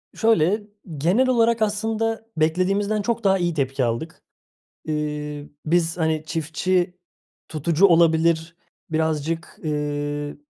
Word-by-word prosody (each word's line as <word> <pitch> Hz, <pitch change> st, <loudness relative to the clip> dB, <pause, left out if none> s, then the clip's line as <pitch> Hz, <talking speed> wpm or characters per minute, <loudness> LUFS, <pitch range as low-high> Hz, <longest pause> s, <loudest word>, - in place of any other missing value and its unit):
Şöyle, 210 Hz, -2 st, +2 dB, 0.3 s
genel 185 Hz, -, +2 dB
olarak 230 Hz, -2 st, +3 dB
aslında 220 Hz, +1 st, -1 dB
beklediğimizden 195 Hz, +6 st, +1 dB
çok 230 Hz, +2 st, -2 dB
daha 195 Hz, -1 st, +4 dB
iyi 175 Hz, -2 st, 0 dB
tepki 135 Hz, -2 st, -1 dB
aldık. 120 Hz, +8 st, -3 dB, 0.6 s
Eee, 150 Hz, -1 st, -4 dB, 0.2 s
biz, 165 Hz, +1 st, +1 dB
hani, 160 Hz, -1 st, 0 dB
çiftçi 175 Hz, +3 st, -1 dB, 0.5 s
tutucu 160 Hz, +4 st, +3 dB
olabilir, 165 Hz, -1 st, +3 dB, 0.3 s
birazcık 160 Hz, +1 st, -2 dB
eee 145 Hz, -1 st, -3 dB
165 Hz, 105 wpm, -23 LUFS, 150-200 Hz, 0.6 s, daha